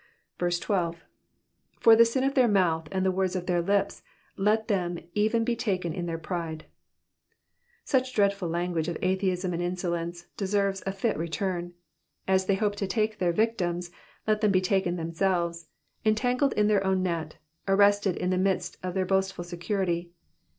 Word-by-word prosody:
12. 175 Hz, -1 st, -1 dB, 0.8 s
^^For 225 Hz, -, +7 dB
the 230 Hz, +1 st, +7 dB
sin 255 Hz, +3 st, 0 dB
of 275 Hz, +1 st, +1 dB
their 260 Hz, -3 st, +4 dB
mouth 170 Hz, -6 st, +2 dB
and 190 Hz, 0 st, 0 dB
the 190 Hz, -, +3 dB
words 190 Hz, 0 st, 0 dB
of 180 Hz, -1 st, -3 dB
their 175 Hz, -1 st, +1 dB
lips 200 Hz, +3 st, 0 dB, 0.3 s
let 215 Hz, +3 st, +1 dB
them 180 Hz, -5 st, 0 dB, 0.2 s
even 220 Hz, +2 st, +2 dB
be 235 Hz, 0 st, 0 dB
taken 185 Hz, -8 st, -1 dB
in 175 Hz, 0 st, -4 dB
their 165 Hz, -1 st, -2 dB
pride.'' 165 Hz, -2 st, -5 dB, 1.2 s
Such 260 Hz, -2 st, +1 dB
dreadful 200 Hz, -3 st, +2 dB
language 170 Hz, -1 st, -1 dB
of 170 Hz, -, -2 dB
atheism 185 Hz, -1 st, 0 dB
and 170 Hz, -, -2 dB
insolence 175 Hz, -1 st, -3 dB
deserves 195 Hz, -1 st, 0 dB
a -, -, +1 dB
fit 195 Hz, +3 st, -1 dB
return. 175 Hz, +1 st, -3 dB, 0.5 s
As 190 Hz, 0 st, +2 dB
they 195 Hz, -, +3 dB
hope 205 Hz, +1 st, 0 dB
to 200 Hz, -, -2 dB
take 215 Hz, +2 st, -1 dB
their 175 Hz, -2 st, +2 dB
victims, 175 Hz, -4 st, 0 dB
so -, -, -28 dB, 0.3 s
let 215 Hz, -1 st, +1 dB
them 210 Hz, -2 st, +3 dB
be 185 Hz, -, +4 dB
taken 185 Hz, -1 st, +1 dB
them 165 Hz, -1 st, -4 dB
selves, 170 Hz, -2 st, 0 dB, 0.4 s
entangled 245 Hz, +5 st, +2 dB
in 210 Hz, -, +2 dB
their 205 Hz, -2 st, +3 dB
own 190 Hz, -1 st, +1 dB
net, 165 Hz, -4 st, -2 dB, 0.3 s
arrested 200 Hz, -1 st, +4 dB
in 180 Hz, +1 st, -1 dB
the 185 Hz, -, +1 dB
midst 190 Hz, 0 st, -1 dB
of 185 Hz, 0 st, -4 dB
their 190 Hz, -1 st, +1 dB
boastful 190 Hz, -1 st, 0 dB
security. 175 Hz, 0 st, -2 dB
190 Hz, 170 wpm, -27 LUFS, 175-205 Hz, 1.2 s, ^^For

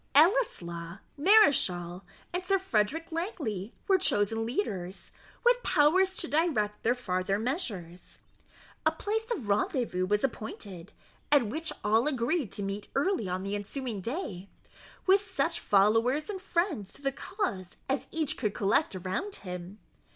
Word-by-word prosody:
Ellieslaw, 190 Hz, -, +2 dB, 0.2 s
Mareschal, 200 Hz, -, +4 dB, 0.3 s
and 360 Hz, +1 st, -1 dB
Sir 390 Hz, +1 st, +3 dB
Frederick 325 Hz, -, 0 dB
Langley 290 Hz, -, -3 dB
were 385 Hz, -1 st, +5 dB
chosen 225 Hz, -, +1 dB
leaders, 195 Hz, -, -3 dB, 0.3 s
with -, -, +5 dB
powers 370 Hz, +4 st, +4 dB
to 340 Hz, -, -3 dB
direct 280 Hz, -11 st, +1 dB
their 240 Hz, +2 st, +2 dB
farther 190 Hz, -4 st, -1 dB
measures. 210 Hz, -, -4 dB, 0.7 s
A -, -, +4 dB
place 445 Hz, +2 st, -2 dB
of 320 Hz, -, -3 dB
rendezvous 200 Hz, -2 st, 0 dB
was 210 Hz, +1 st, +1 dB
appointed, 210 Hz, -8 st, -5 dB, 0.4 s
at 285 Hz, -5 st, +6 dB
which 315 Hz, +10 st, -3 dB
all 220 Hz, +5 st, +3 dB
agreed 265 Hz, -, 0 dB
to 205 Hz, -, -2 dB
meet 195 Hz, +1 st, -4 dB
early 275 Hz, -, +1 dB
on 185 Hz, +1 st, -2 dB
the 195 Hz, +1 st, -3 dB
ensuing 215 Hz, +1 st, -4 dB
day, 200 Hz, -, -4 dB, 0.6 s
with 390 Hz, +1 st, +5 dB
such 370 Hz, -4 st, -1 dB
followers 225 Hz, -, +3 dB
and 380 Hz, -2 st, -6 dB
friends 340 Hz, -, -1 dB
to -, -, -14 dB
the 275 Hz, -, +1 dB
cause 230 Hz, -, -4 dB
as 270 Hz, 0 st, -1 dB
each 310 Hz, -2 st, -1 dB
could 215 Hz, -4 st, -1 dB
collect 200 Hz, -1 st, +2 dB
around 190 Hz, -, -3 dB
him. 180 Hz, +1 st, -7 dB
240 Hz, 140 wpm, -29 LUFS, -, 0.7 s, at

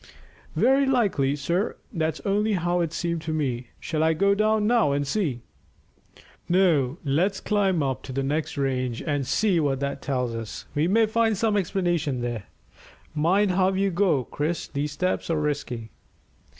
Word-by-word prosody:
"Very 270 Hz, +2 st, +4 dB
likely, 200 Hz, -, +2 dB
sir. 170 Hz, +8 st, -1 dB, 0.2 s
That's 160 Hz, -3 st, -1 dB
only 210 Hz, +2 st, +1 dB
how 175 Hz, -1 st, 0 dB
it 170 Hz, -3 st, 0 dB
seemed 170 Hz, -1 st, -2 dB
to 160 Hz, 0 st, -4 dB
me. 130 Hz, -6 st, -2 dB
Shall 155 Hz, -2 st, -2 dB
I 160 Hz, 0 st, +3 dB
go 200 Hz, +5 st, +3 dB
down 215 Hz, +1 st, +2 dB
now 210 Hz, -11 st, +3 dB
and 145 Hz, 0 st, 0 dB
see?" 140 Hz, -, -1 dB, 1.1 s
"No; 165 Hz, -7 st, +3 dB
let's 180 Hz, +8 st, +1 dB
climb 195 Hz, -6 st, +1 dB
up 130 Hz, -1 st, -2 dB
to -, -, -7 dB
the 135 Hz, +1 st, -1 dB
next 150 Hz, +3 st, -2 dB
range 130 Hz, -3 st, -1 dB
and 145 Hz, -4 st, -1 dB
see 200 Hz, -6 st, +2 dB
what 140 Hz, -4 st, 0 dB
that 140 Hz, 0 st, -3 dB
tells 125 Hz, -3 st, -1 dB
us; 115 Hz, -2 st, -6 dB
we 150 Hz, +3 st, +1 dB
may 225 Hz, +4 st, +4 dB
find 225 Hz, -1 st, +1 dB
some 220 Hz, +1 st, +1 dB
explanation 175 Hz, -8 st, 0 dB
there. 120 Hz, -4 st, -3 dB, 0.7 s
Mind 185 Hz, +6 st, +2 dB
how 185 Hz, +1 st, +2 dB
you 195 Hz, +1 st, +1 dB
go, 170 Hz, -7 st, +2 dB
Chris; 155 Hz, +7 st, -3 dB
these 145 Hz, +1 st, -3 dB
steps 180 Hz, +6 st, -1 dB
are 165 Hz, -2 st, +1 dB
risky." 135 Hz, -7 st, -3 dB
160 Hz, 165 wpm, -25 LUFS, 140-195 Hz, 1.1 s, Very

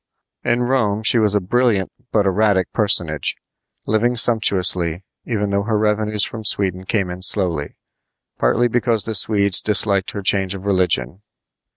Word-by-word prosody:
In 120 Hz, +1 st, 0 dB
Rome 115 Hz, -5 st, -1 dB
she 115 Hz, +2 st, +4 dB
was 105 Hz, -2 st, +2 dB
a -, -, +3 dB
brilliant 105 Hz, 0 st, 0 dB, 0.2 s
but 105 Hz, -2 st, +1 dB
erratic 95 Hz, -1 st, 0 dB
personage, 85 Hz, -, +1 dB, 0.5 s
living 120 Hz, +3 st, 0 dB
sumptuously, 95 Hz, -7 st, +2 dB, 0.2 s
even 105 Hz, -4 st, -2 dB
though 100 Hz, 0 st, 0 dB
her 110 Hz, +1 st, -2 dB
revenues 105 Hz, 0 st, 0 dB
from 110 Hz, -2 st, -7 dB
Sweden 95 Hz, -3 st, 0 dB
came 95 Hz, -2 st, -2 dB
in 90 Hz, +1 st, -8 dB
slowly, 90 Hz, -6 st, +1 dB, 0.6 s
partly 115 Hz, -, +1 dB
because 120 Hz, -2 st, 0 dB
the 110 Hz, -, -4 dB
Swedes 100 Hz, -2 st, +3 dB
disliked 100 Hz, -2 st, +1 dB
her 100 Hz, -, -6 dB
change 95 Hz, 0 st, +1 dB
of 95 Hz, 0 st, -10 dB
religion. 90 Hz, -5 st, -1 dB
100 Hz, 150 wpm, -18 LUFS, 95-110 Hz, 0.6 s, she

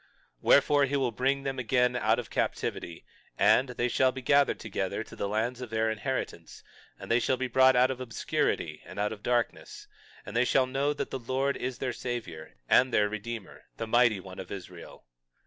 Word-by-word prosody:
22:12 -, -, -41 dB
Wherefore, 145 Hz, 0 st, +5 dB
he 140 Hz, +1 st, -2 dB
will 130 Hz, -3 st, 0 dB
bring 135 Hz, +4 st, 0 dB
them 135 Hz, -1 st, -3 dB
again 125 Hz, 0 st, +2 dB
out 125 Hz, -, +2 dB
of -, -, -6 dB
captivity, 85 Hz, -1 st, -3 dB, 0.3 s
and 130 Hz, +1 st, +4 dB
they 120 Hz, 0 st, -1 dB
shall 130 Hz, +2 st, +2 dB
be 130 Hz, 0 st, -8 dB
gathered 140 Hz, +1 st, +3 dB
together -, -, -3 dB
to -, -, -13 dB
the -, -, -2 dB
lands 115 Hz, +4 st, -1 dB
of 125 Hz, -, -6 dB
their 110 Hz, 0 st, 0 dB
inheritance; 110 Hz, -7 st, -4 dB, 0.3 s
and -, -, -8 dB
they 115 Hz, -, +4 dB
shall 130 Hz, +2 st, +1 dB
be 130 Hz, -, -2 dB
brought 130 Hz, +1 st, +5 dB
out 125 Hz, +1 st, +4 dB
of 130 Hz, -1 st, -6 dB
obscurity 120 Hz, -2 st, -2 dB
and -, -, -12 dB
out 105 Hz, +1 st, 0 dB
of 105 Hz, -, -11 dB
darkness; 120 Hz, -1 st, -2 dB, 0.4 s
and -, -, -8 dB
they 120 Hz, -, +4 dB
shall 130 Hz, +1 st, +3 dB
know 135 Hz, +3 st, 0 dB
that 150 Hz, -, -4 dB
the 135 Hz, -, -3 dB
Lord 130 Hz, +3 st, -1 dB
is 130 Hz, 0 st, -4 dB
their 130 Hz, -2 st, -2 dB
Savior 90 Hz, -, -6 dB
and 130 Hz, +1 st, +4 dB
their 105 Hz, -2 st, +3 dB
Redeemer, 110 Hz, 0 st, -7 dB
the 115 Hz, -, -3 dB
Mighty 120 Hz, -2 st, +3 dB
One 95 Hz, 0 st, -10 dB
of 95 Hz, -, -8 dB
Israel. 90 Hz, -3 st, -10 dB
125 Hz, 200 wpm, -29 LUFS, 110-130 Hz, 0.4 s, Wherefore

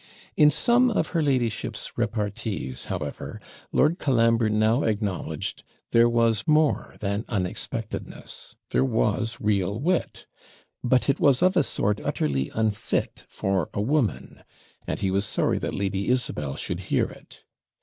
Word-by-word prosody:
In 150 Hz, -, +7 dB
some 240 Hz, -, +3 dB
of 225 Hz, -, 0 dB
her 170 Hz, -2 st, 0 dB
ladyship's 130 Hz, -7 st, -1 dB
repartees, 100 Hz, -, -3 dB
however, -, -, -5 dB, 0.3 s
Lord 160 Hz, +5 st, +3 dB
Colambre 115 Hz, -4 st, +3 dB
now 110 Hz, +4 st, +3 dB
acknowledged 105 Hz, -5 st, -2 dB, 0.3 s
there 115 Hz, 0 st, +5 dB
was 115 Hz, -3 st, +2 dB
more 155 Hz, -1 st, +2 dB
than 100 Hz, +1 st, -1 dB
unexpectedness; 95 Hz, -5 st, -4 dB, 0.2 s
there 60 Hz, -, +3 dB
was 85 Hz, -, 0 dB
real 100 Hz, -1 st, 0 dB
wit; 175 Hz, +5 st, -1 dB, 0.6 s
but 125 Hz, 0 st, +2 dB
it 140 Hz, +1 st, +2 dB
was 140 Hz, +1 st, +4 dB
of 185 Hz, +1 st, +4 dB
a 175 Hz, -, +5 dB
sort 105 Hz, -6 st, 0 dB
utterly 70 Hz, -3 st, -1 dB
unfit 110 Hz, -1 st, -1 dB
for 95 Hz, -4 st, -1 dB
a 100 Hz, -, 0 dB
woman, 130 Hz, 0 st, -1 dB, 0.4 s
and -, -, -3 dB
he 95 Hz, -, +1 dB
was 100 Hz, +1 st, +2 dB
sorry -, -, 0 dB
that -, -, -3 dB
Lady 100 Hz, 0 st, -1 dB
Isabel 75 Hz, -, -1 dB
should -, -, -3 dB
hear -, -, +3 dB
it. -, -, -13 dB
110 Hz, 140 wpm, -25 LUFS, 100-135 Hz, 0.6 s, In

